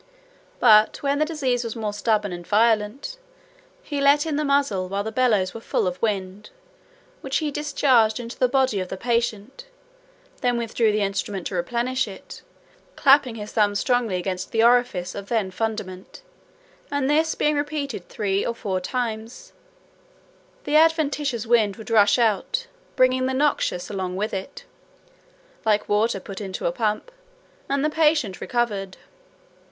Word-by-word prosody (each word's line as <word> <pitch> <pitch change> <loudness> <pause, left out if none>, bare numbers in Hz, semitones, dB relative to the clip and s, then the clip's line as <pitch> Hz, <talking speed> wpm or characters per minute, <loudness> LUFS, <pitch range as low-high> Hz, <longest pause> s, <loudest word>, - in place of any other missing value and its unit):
But 215 0 +5
when 280 0 +1
the 305 - +3
disease 265 -6 -1
was 230 -1 -5
more 215 -2 -3
stubborn 210 -2 0
and 175 -1 -8
violent, 225 - +1 0.6
he 290 - -3
let 285 +2 +4
in 315 -2 -2
the 305 - 0
muzzle 280 -11 +1
while 200 +1 -2
the 220 - -4
bellows 220 -6 +1
were 230 - -8
full - - -1
of 180 0 -3
wind, 200 -2 -2 0.7
which 270 0 -1
he 305 -2 -2
discharged 270 -7 +2
into 235 0 -7
the 255 - +4
body 260 -5 +1
of 185 - -3
the 190 - -6
patient; 235 - -2 0.8
then 245 -2 +1
withdrew 230 -1 +1
the 210 0 0
instrument 195 -1 -3
to - - -4
replenish 240 +8 -1
it, 195 -2 -10 0.5
clapping 275 -4 +4
his 210 -1 -7
thumb 205 -2 +2
strongly 240 -2 +1
against 180 0 -3
the 225 0 +2
orifice 235 -7 +2
of 200 0 -8
the 215 -5 0
fundament; 210 - -5 0.7
and 285 -2 -1
this 315 +2 +2
being 300 0 +1
repeated 290 -8 -3
three 200 -2 -1
or 235 - -2
four 190 -5 -2
times, 230 - -5 1.1
the 290 - -1
adventitious 295 -6 +2
wind 220 -4 +3
would 220 0 -10
rush 210 -1 +5
out, 235 - 0 0.3
bringing 255 0 +3
the 260 - -1
noxious 270 -10 0
along 185 -2 -4
with 210 +3 -2
it, 190 0 -6 1.0
(like 215 -1 +1
water 210 0 +1
put 195 +2 -8
into 190 -2 -5
a 170 - +2
pump), 215 - -2 0.6
and 280 +1 +1
the - - +2
patient 300 - +1
recovered. 205 -6 -2
230 Hz, 155 wpm, -23 LUFS, 200-275 Hz, 1.1 s, But